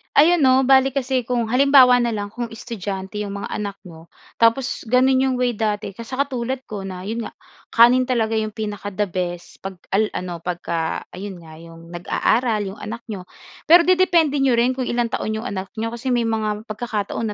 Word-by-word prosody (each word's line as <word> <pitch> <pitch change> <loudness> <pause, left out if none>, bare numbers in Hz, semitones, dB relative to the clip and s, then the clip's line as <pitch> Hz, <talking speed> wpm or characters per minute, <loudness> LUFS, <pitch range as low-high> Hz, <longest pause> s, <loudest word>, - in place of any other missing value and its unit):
Ayan, 315 0 +5
no. 260 +1 +5
Bale 265 0 +4
kasi 260 -2 -1
kung 235 -2 -1
halimbawa 255 -1 +6
na 235 -1 0
lang 205 -1 -4
kung 240 +3 -5
estudyante 205 -4 -6
'yong 205 -1 -4
mga 200 - -5
anak 200 -2 -4
mo, 165 -3 -14 0.2
tapos 230 +2 +1
gano'n 255 +3 +3
'yong 265 - +1
way 245 -3 0
dati 215 -1 -1
ka 230 +4 -10
sa 260 +3 -2
katulad 260 -1 -3
ko 200 -2 -5
na 185 -1 -6
'yon 220 +4 -4
nga - - -9 0.4
kanin 245 +2 +6
talaga 225 -3 0
'yong 215 -1 -2
pinaka-da-best, 200 -4 -4
pag 190 -2 -7
al 210 +2 +1
ano 180 -1 -4
pagka 170 -1 -3 0.2
ayun 190 -2 -7
nga 160 -1 -13
'yong 165 0 -13
nag-aaral 215 +6 0
'yong 195 +1 -6
anak 230 +2 -6
n'yo. 190 -4 -6 0.4
Pero 340 +2 +8
dedepende 345 -5 +3
n'yo 270 -2 +3
rin 245 +2 +2
kung 255 - -1
ilang 240 -1 -1
taon 220 0 -2
'yong 220 +3 -4
anak 190 +3 -6
n'yo 230 - -1
kasi 235 +2 -3
may 235 -2 +1
mga 215 -1 -1
pagkakataon 215 -1 -3
225 Hz, 190 wpm, -21 LUFS, 200-250 Hz, 0.4 s, Pero